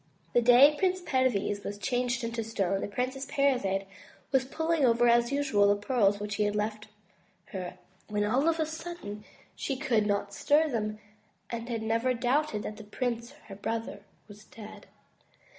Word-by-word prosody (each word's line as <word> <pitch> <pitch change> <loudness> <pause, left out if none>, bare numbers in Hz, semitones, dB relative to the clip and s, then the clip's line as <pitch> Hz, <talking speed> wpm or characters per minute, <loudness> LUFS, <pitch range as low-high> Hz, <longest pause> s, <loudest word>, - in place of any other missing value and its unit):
The 240 - +5
day 245 +3 +8
that 300 - -9
Prince 370 -1 +2
Perviz 255 - 0
was 205 - -5
changed 245 +2 -1
to 230 -1 -3
stone, 195 -3 -1
the - - -2
Princess 255 +5 -3
Parizade 250 -9 +1 0.5
was 265 -1 +3
pulling 320 +2 0
over 240 -1 +4
as 235 +1 +4
usual 270 -8 +3
the 205 - +4
pearls 205 -2 +1
which 205 0 -4
he 210 - +2
had 205 0 -1
left 215 0 -2 0.6
her, 185 -1 -6 0.3
when 210 -1 -1
all 260 +9 +2
of 330 0 0
a 315 - +2
sudden 315 -10 -7 0.3
she 275 - -3
could 230 -6 +1
not 200 0 -1
stir 300 +8 +3
them, 215 -4 -2 0.5
and 235 0 -5
never 230 +3 +1
doubted 245 -2 0
that 210 - -6
the 220 - -9
prince, 235 +3 -3
her 195 - -8
brother, 225 +1 -4 0.3
was 210 0 -14
dead. 215 -1 -12
235 Hz, 170 wpm, -29 LUFS, 210-265 Hz, 0.6 s, day